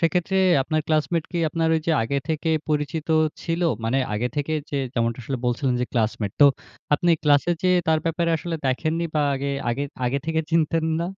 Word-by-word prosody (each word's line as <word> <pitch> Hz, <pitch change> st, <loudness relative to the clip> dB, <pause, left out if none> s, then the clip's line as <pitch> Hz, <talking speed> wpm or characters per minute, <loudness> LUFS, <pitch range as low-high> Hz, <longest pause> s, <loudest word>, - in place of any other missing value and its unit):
সেক্ষেত্রে 180 Hz, +3 st, +1 dB, 0.3 s
আপনার 155 Hz, +3 st, -1 dB
ক্লাসমেট 155 Hz, +1 st, +1 dB
কি 170 Hz, -, -1 dB
আপনার 165 Hz, +1 st, 0 dB
ওই 160 Hz, -, +1 dB
যে, 165 Hz, -, +3 dB
আগে 140 Hz, +5 st, -1 dB
থেকে 160 Hz, +1 st, -1 dB, 0.2 s
পরিচিত 150 Hz, +1 st, -2 dB, 0.3 s
ছিল? 165 Hz, 0 st, -2 dB, 0.2 s
মানে 130 Hz, +4 st, +1 dB, 0.2 s
আগে 120 Hz, +4 st, -1 dB
থেকে 145 Hz, +2 st, -1 dB, 0.2 s
যে, 145 Hz, -, -2 dB, 0.2 s
যেমনটা 115 Hz, 0 st, 0 dB
আসলে 135 Hz, +4 st, -3 dB
বলছিলেন, 125 Hz, +1 st, 0 dB
যে, 125 Hz, -, 0 dB
ক্লাসমেট। 110 Hz, -3 st, -1 dB
তো 145 Hz, -, +9 dB, 0.5 s
আপনি 175 Hz, +4 st, +1 dB
ক্লাসে 145 Hz, +3 st, +3 dB
যেয়ে 180 Hz, -1 st, +4 dB
তার 160 Hz, -, +4 dB
ব্যাপারে 165 Hz, +1 st, 0 dB
আসলে 165 Hz, +1 st, -4 dB
দেখেননি? 155 Hz, +6 st, 0 dB
বা 150 Hz, -, +2 dB
আগে, 140 Hz, +1 st, -3 dB, 0.2 s
আগে 135 Hz, +4 st, -1 dB, 0.2 s
আগে 135 Hz, +3 st, 0 dB
থেকে 160 Hz, 0 st, +1 dB
চিনতেন 165 Hz, 0 st, +2 dB, 0.2 s
না? -, -, 0 dB
155 Hz, 190 wpm, -23 LUFS, 135-165 Hz, 0.5 s, তো